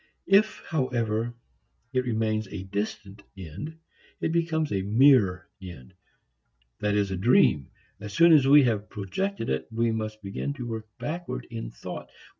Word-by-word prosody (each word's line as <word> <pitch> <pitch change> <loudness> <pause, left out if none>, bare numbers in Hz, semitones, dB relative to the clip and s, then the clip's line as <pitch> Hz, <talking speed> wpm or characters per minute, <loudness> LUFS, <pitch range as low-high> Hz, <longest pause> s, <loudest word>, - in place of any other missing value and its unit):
If, 205 +3 +3
however, 120 -6 -1 0.6
it 130 -1 +1
remains 110 -2 -1
a 95 0 -6
distant 100 0 -5 0.2
end, 95 - -8 0.4
it - - -1
becomes 160 -2 0
a 95 - 0
mere 100 -3 +4
end, 90 -4 -11 0.9
that 105 0 0
is 100 -2 +1
a - - -1
dream. 75 - +3 0.3
As 105 0 -7
soon 165 +10 +6
as 140 -4 +5
we 145 +1 +8
have 110 -4 0
projected 115 - -3
it, - - -2
we 115 +1 +1
must 110 -1 -4
begin 100 +8 -3
to 130 -4 -7
work 110 -2 -5
backward 170 +3 -5
in 115 -1 -5
thought. - - -8
110 Hz, 150 wpm, -27 LUFS, 100-140 Hz, 0.9 s, we